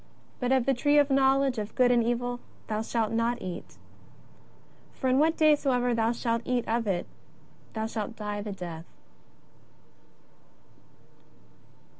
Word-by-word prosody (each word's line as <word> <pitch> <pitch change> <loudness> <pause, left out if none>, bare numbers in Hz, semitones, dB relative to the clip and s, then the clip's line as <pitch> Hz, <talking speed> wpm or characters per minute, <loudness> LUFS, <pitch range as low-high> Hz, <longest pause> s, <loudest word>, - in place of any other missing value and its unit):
But 250 0 -1
of 260 -2 +3
the 275 - +3
tree 290 +4 +2
of 290 -1 +4
knowledge 270 -2 +3
of 210 0 -6
good 250 -1 +4
and 240 -1 +4
evil, 245 +1 -1 0.3
thou 215 0 -2
shalt 225 -1 -1
not 230 +1 0
eat. 180 -1 -7 1.2
For 260 - -2
in 260 +1 +3
what 320 +2 +3
day 310 -1 +6
soever 250 -4 +1
thou 230 0 +2
shalt 230 -1 -1
eat 250 -1 -1
of 230 0 0
it, 180 -3 0 0.7
thou 220 -1 -2
shalt 220 0 -4
die 210 -1 -4
the 205 0 -5
death." 175 -4 -7
240 Hz, 145 wpm, -28 LUFS, 220-260 Hz, 1.2 s, day